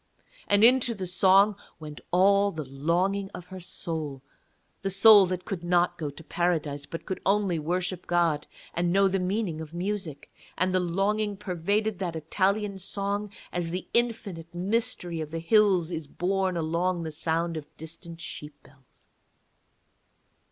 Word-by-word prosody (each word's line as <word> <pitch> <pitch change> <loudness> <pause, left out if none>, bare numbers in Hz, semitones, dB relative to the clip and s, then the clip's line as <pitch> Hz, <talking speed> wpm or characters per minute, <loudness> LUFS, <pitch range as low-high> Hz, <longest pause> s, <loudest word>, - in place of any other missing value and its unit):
And 205 +1 +4
into 240 0 +5
the 190 -2 -4
song 195 +3 +5 0.2
went 150 -1 -9
all 200 +3 +4
the 155 -5 -6
longing 175 +8 0
of 180 - -8
her 185 0 -9
soul, 155 -6 -4 0.6
the 195 - -1
soul 195 0 +8
that 180 0 -4
could 185 -4 -5
not 175 0 +2
go 150 -3 -2
to 145 +3 -12
Paradise, 155 -5 -1
but 165 - -7
could 190 - -4
only 195 -4 +1
worship 180 +3 -2
God 170 -4 +1 0.3
and 175 0 0
know 195 +1 +4
the 195 0 0
meaning 180 -3 -2
of 160 +1 -9
music, 180 -5 -4 0.2
and 185 +1 +1
the 185 - +3
longing 200 +4 0
pervaded 200 +2 -1
that 175 -4 -3
Italian 195 +5 0
song 200 +2 -2 0.2
as 175 -1 -2
the 180 +2 -4
infinite 200 -8 -1
mystery 185 -3 -1
of 155 - -5
the 165 - -5
hills 180 -1 +3
is 160 -3 -4
borne 185 +3 -1
along 170 +2 0
the 160 - -4
sound 165 +2 -1
of 155 -2 -6
distant 165 +1 -8
sheep 150 -3 -8
bells. 135 -2 -24
180 Hz, 155 wpm, -27 LUFS, 165-195 Hz, 0.6 s, soul